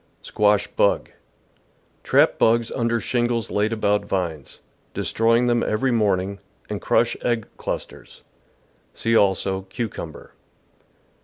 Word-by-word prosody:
Squash 105 Hz, -1 st, +2 dB
Bug. 100 Hz, -, 0 dB, 0.5 s
— -, -, -39 dB
Trap -, -, +3 dB
bugs 115 Hz, 0 st, +3 dB
under 115 Hz, -1 st, 0 dB
shingles 120 Hz, -2 st, -1 dB
laid 105 Hz, +2 st, +1 dB
about 105 Hz, -2 st, +1 dB
vines, 85 Hz, -8 st, -4 dB, 0.4 s
destroying 115 Hz, +2 st, +2 dB
them 120 Hz, -1 st, +2 dB
every 130 Hz, +5 st, 0 dB
morning, 100 Hz, -3 st, 0 dB, 0.3 s
and -, -, -4 dB
crush -, -, +2 dB
egg 120 Hz, -3 st, 0 dB
clusters. -, -, -7 dB, 0.7 s
See, 115 Hz, 0 st, 0 dB
also. 95 Hz, -2 st, +2 dB
Cucumber. 95 Hz, -7 st, -6 dB
110 Hz, 110 wpm, -22 LUFS, 100-115 Hz, 0.7 s, Trap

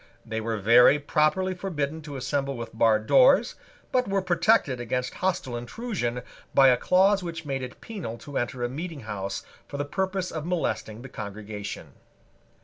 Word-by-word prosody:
They 110 Hz, 0 st, -3 dB
were 110 Hz, 0 st, -2 dB
very 120 Hz, +7 st, +6 dB
properly 155 Hz, +6 st, +1 dB
forbidden 160 Hz, -5 st, -3 dB
to 145 Hz, -, -6 dB
assemble 135 Hz, +1 st, -2 dB
with 115 Hz, -1 st, -7 dB
barred 110 Hz, -1 st, +3 dB
doors, 265 Hz, -, +5 dB, 0.4 s
but 250 Hz, -1 st, +2 dB
were 195 Hz, -1 st, 0 dB
protected 175 Hz, -, +2 dB
against 125 Hz, +1 st, -2 dB
hostile 180 Hz, -9 st, -2 dB
intrusion 125 Hz, -, -3 dB, 0.3 s
by 135 Hz, -1 st, +8 dB
a 125 Hz, -, +4 dB
clause 190 Hz, +7 st, +4 dB
which 165 Hz, -2 st, -6 dB
made 135 Hz, -2 st, -2 dB
it 125 Hz, -1 st, -8 dB
penal 190 Hz, -, -6 dB
to 140 Hz, +4 st, -4 dB
enter 120 Hz, 0 st, -3 dB
a -, -, +1 dB
meeting 155 Hz, +3 st, -6 dB
house 100 Hz, -3 st, -5 dB, 0.2 s
for 140 Hz, -, -6 dB
the 145 Hz, -, -2 dB
purpose 190 Hz, +4 st, -2 dB
of 155 Hz, -2 st, -4 dB
molesting 155 Hz, -9 st, -2 dB
the 135 Hz, -, -9 dB
congregation. 105 Hz, -2 st, -7 dB
140 Hz, 165 wpm, -26 LUFS, 120-180 Hz, 0.4 s, by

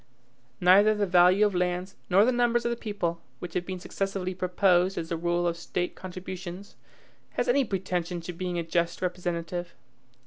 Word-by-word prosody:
Neither 200 Hz, +4 st, +6 dB
the 210 Hz, -1 st, +1 dB
value 180 Hz, +2 st, +5 dB
of 205 Hz, -, +1 dB
lands, 180 Hz, +1 st, -1 dB
nor 195 Hz, +3 st, +6 dB
the 250 Hz, -, +3 dB
numbers 240 Hz, -1 st, +2 dB
of 235 Hz, -, +1 dB
the -, -, 0 dB
people, 200 Hz, -7 st, -3 dB, 0.2 s
which 180 Hz, -, -8 dB
have 175 Hz, -, -2 dB
been 185 Hz, -1 st, -4 dB
successively 195 Hz, 0 st, -3 dB
proposed 185 Hz, 0 st, +2 dB
as 165 Hz, -1 st, -3 dB
the 170 Hz, -, -1 dB
rule 175 Hz, +1 st, 0 dB
of 170 Hz, -1 st, +1 dB
State 175 Hz, +1 st, -3 dB
contributions, 185 Hz, +1 st, -8 dB, 0.6 s
has -, -, -1 dB
any 270 Hz, +3 st, +4 dB
pretension 180 Hz, -4 st, -2 dB
to 175 Hz, +2 st, -6 dB
being 180 Hz, 0 st, -3 dB
a 170 Hz, -, -1 dB
just 170 Hz, +2 st, -1 dB
representative. 175 Hz, -1 st, -3 dB
180 Hz, 175 wpm, -27 LUFS, 175-195 Hz, 0.6 s, Neither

